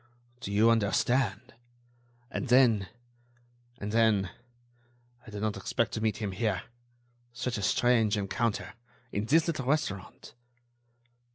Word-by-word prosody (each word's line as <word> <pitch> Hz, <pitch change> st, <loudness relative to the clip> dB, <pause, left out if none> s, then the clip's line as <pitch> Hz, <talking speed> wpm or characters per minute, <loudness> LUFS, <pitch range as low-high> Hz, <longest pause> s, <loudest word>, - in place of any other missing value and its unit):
Do 120 Hz, -5 st, -6 dB
you 110 Hz, +3 st, +5 dB
understand? 120 Hz, +3 st, +1 dB, 0.8 s
And 140 Hz, -, -3 dB
then... 115 Hz, -6 st, +4 dB, 0.9 s
and 105 Hz, +1 st, -4 dB
then.... 110 Hz, -5 st, +3 dB, 1.0 s
I -, -, -8 dB
did 105 Hz, -1 st, -6 dB
not 110 Hz, -1 st, 0 dB
expect 115 Hz, +4 st, -1 dB
to 110 Hz, -, -3 dB
meet 110 Hz, -1 st, 0 dB
him 105 Hz, -3 st, -3 dB
here.... 95 Hz, -2 st, -1 dB, 0.7 s
Such 120 Hz, -2 st, -3 dB
a -, -, -4 dB
strange 110 Hz, +1 st, +3 dB
encounter!... 110 Hz, +2 st, -2 dB, 0.4 s
in 100 Hz, +1 st, -2 dB
this 160 Hz, +7 st, +4 dB
little 150 Hz, -7 st, -2 dB
restaurant...." 115 Hz, -10 st, -2 dB
110 Hz, 120 wpm, -29 LUFS, 100-125 Hz, 1.0 s, you